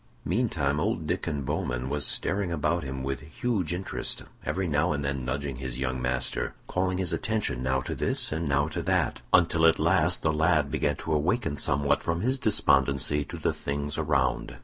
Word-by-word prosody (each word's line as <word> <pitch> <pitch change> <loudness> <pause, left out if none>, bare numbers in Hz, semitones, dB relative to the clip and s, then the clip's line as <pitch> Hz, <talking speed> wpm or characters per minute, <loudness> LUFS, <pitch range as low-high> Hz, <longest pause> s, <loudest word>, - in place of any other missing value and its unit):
Meantime 75 - 0
old - - -1
Diccon 70 -3 -2
Bowman 60 0 -2
was 75 +1 +1
staring 100 -2 +1
about 85 +1 0
him 65 -1 -5
with 70 -1 -2
huge 100 - -2
interest, 90 +2 -2 0.2
every 95 -1 -1
now 75 -1 +2
and 70 -1 -2
then 70 -2 -2
nudging 70 +1 -3
his 65 -2 -5
young 65 -1 -2
master, 60 -1 -1
calling 90 0 -1
his 90 -3 +1
attention 110 - -1
now 65 +1 +1
to - - -4
this - - -1
and 80 0 -2
now 70 +1 +2
to 80 - -3
that, - - 0
until 85 -1 +4
at 80 0 +6
last - - +2
the 80 - +2
lad 75 -2 +2
began - - +1
to 80 - -3
awaken 80 +3 +1
somewhat 70 +1 +1
from 85 +1 -1
his 130 +3 0
despondency 70 - +2
to - - -8
the - - 0
things 70 +1 -3
around. 70 -5 0
75 Hz, 185 wpm, -27 LUFS, 70-85 Hz, 0.2 s, at